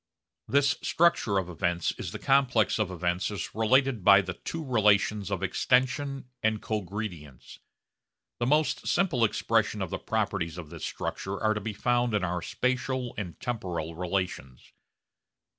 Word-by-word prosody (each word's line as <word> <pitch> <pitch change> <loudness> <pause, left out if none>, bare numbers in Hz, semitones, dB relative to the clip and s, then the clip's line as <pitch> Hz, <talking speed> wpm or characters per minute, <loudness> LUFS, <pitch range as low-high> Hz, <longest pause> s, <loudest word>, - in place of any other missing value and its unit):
This 140 0 +3
structure 160 -11 +2
of 95 -2 0
events 85 0 -1
is - - -4
the - - -5
complex 130 -7 +2
of 105 -3 +1
events 90 0 -1
as 105 -2 -5
related 120 +1 +2
by 100 +2 +8
the 90 -1 -5
two 165 - -6
relations 105 -4 +2
of 95 -2 -2
extension 130 +7 +1 0.2
and 110 -1 +1
cogredience. 95 - -6 0.8
The 120 - 0
most 150 +3 +1
simple 170 -10 +2
expression 105 0 +1
of 95 -4 -3
the - - -3
properties 85 0 -2
of 80 -4 -8
this - - -6
structure 95 +1 -4
are 110 -1 +2
to 105 - -4
be 110 +1 -4
found 120 +2 +1
in 100 - +1
our 90 -1 -1
spatial 125 +3 -1
and 90 -5 -6
temporal 90 -9 -3
relations. 90 -7 -4
105 Hz, 150 wpm, -28 LUFS, 90-125 Hz, 0.8 s, by